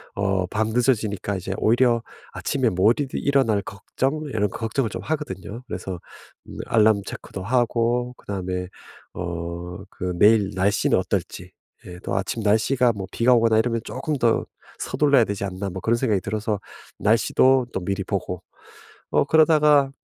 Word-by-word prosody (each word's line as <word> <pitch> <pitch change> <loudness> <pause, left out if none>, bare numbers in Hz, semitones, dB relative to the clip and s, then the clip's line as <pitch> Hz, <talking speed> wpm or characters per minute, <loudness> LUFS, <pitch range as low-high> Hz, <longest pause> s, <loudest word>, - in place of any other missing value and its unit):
어 95 -2 0
밤늦어지니까 110 -2 0
이제 95 +1 -4
오히려 120 +1 +3 0.3
아침에 130 -4 0
못 115 +9 +1
일어날 135 -7 +2
걱정 135 +10 -3
이런 110 -7 -1
걱정을 115 +3 -2
좀 - - -5
하거든요. 120 -7 -5
그래서 95 -2 -5 0.5
음 - - -10
alarm 110 -2 +4
check도 - - -7
하고 120 +2 +1
그다음에 90 -2 -4 0.5
어 85 0 -5 0.2
그 90 -1 -3
내일 105 -2 +5
날씨는 95 +2 +2
어떨지 - - -3 0.3
예 90 - -9
또 - - -3
'아침 95 +4 -2
날씨가 115 +4 +3
뭐 95 -2 -6
비가 125 +2 +3
오거나 115 -2 +4
이러면 115 0 0
쪼끔 155 -3 -3
더 120 -3 +2 0.3
서둘러야 140 -4 +3
되지 100 -1 -4
않나?' 95 +1 -4
뭐 95 +1 -6
그런 115 +4 +2
생각이 110 -7 +1
들어서 105 +1 -2 0.4
날씨도 125 +4 +3
또 - - -1
미리 100 +1 -1
보고 90 -2 -4 0.7
어 - - +3
그러다가 150 -2 +4
110 Hz, 330 characters per minute, -23 LUFS, 95-125 Hz, 0.7 s, 내일